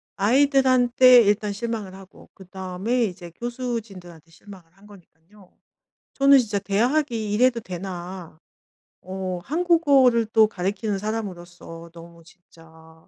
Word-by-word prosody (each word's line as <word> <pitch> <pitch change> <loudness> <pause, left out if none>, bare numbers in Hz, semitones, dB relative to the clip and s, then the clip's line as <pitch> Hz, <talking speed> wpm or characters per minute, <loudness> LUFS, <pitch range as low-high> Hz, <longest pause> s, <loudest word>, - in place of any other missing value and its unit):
아이들한테 255 +1 +4
일단 210 -1 0
실망을 215 -3 -5
하고 190 0 -16
그다음에 190 +5 -4
이제 180 -3 -8
교수진들한테 205 - -7
실망을 180 -1 -16
한 200 +1 -20
거니깐요. 190 0 -20 0.6
저는 275 0 +5
진짜 220 -5 -1
대학이 225 +3 -1
이래도 240 +2 +2
되나. 180 -3 -8 0.6
어 185 -1 -5
한국어를 285 - +2
또 220 -1 +5
가르치는 200 +1 -3
사람으로서 175 -5 -7
너무 170 0 -15
진짜 160 -1 -21
200 Hz, 290 characters per minute, -23 LUFS, 180-240 Hz, 0.6 s, 저는